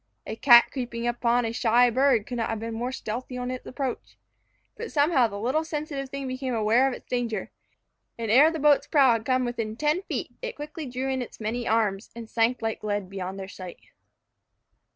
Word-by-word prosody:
A - - -5
cat 240 0 +7
creeping 240 -3 -4
upon 240 0 +1
a 225 - -2
shy 240 +1 +3
bird 255 -3 +3
could 245 - -5
not 230 - -1
have 225 - -2
been 225 +1 -5
more 240 +3 -3
stealthy 250 +1 -5
in 250 0 -3
its 255 - -7
approach. 260 -2 -5 0.6
But 470 - -7
somehow 285 -4 +3
the 200 -2 -7
little 260 +9 0
sensitive 300 -3 -4
thing 275 0 -5
became 255 -1 -3
aware 225 +4 +3
of 265 - -2
its - - -13
danger, 240 -3 -3 0.7
and 225 -2 -2
ere 280 +7 +7
the 325 - -4
boat's 290 -1 +3
prow 275 -5 +5
had 225 -1 0
come 255 -1 +1
within 230 -3 -3
ten 300 +7 +1
feet, - - -4
it - - -5
quickly 300 0 -7
drew 255 +2 -3
in 265 -1 -1
its 245 - -8
many 230 +2 -3
arms, 215 -2 0
and 230 -1 -8
sank 230 +2 0
like 225 -1 -3
lead 205 -3 -2
beyond 190 0 -5
their 190 - -6
sight. 185 -2 -11
245 Hz, 205 wpm, -26 LUFS, 225-270 Hz, 0.7 s, cat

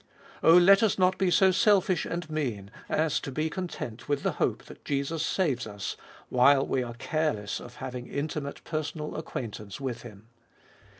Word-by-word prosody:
Oh, 165 +2 +7
let 195 +3 +7
us 220 -4 +2
not 185 0 +2
be 190 - +3
so 190 +1 +5
selfish 190 -3 +3
and 170 -1 -4
mean 120 -11 -3 0.2
as 155 -2 +1
to 135 - -6
be 155 +4 -1
content 145 - -6
with 145 -1 0
the - - +1
hope - - +1
that - - -14
Jesus 140 +3 -1
saves 140 - 0
us, 100 -1 -5 0.3
while 135 +2 +5
we 130 - 0
are 120 -1 -5
careless 135 -6 -1
of 120 0 -11
having 125 -1 -6
intimate 145 0 -4
personal 155 -1 -4
acquaintance 105 -9 -6
with 125 -4 -4
Him. 105 -3 -12
145 Hz, 170 wpm, -28 LUFS, 120-165 Hz, 0.3 s, Oh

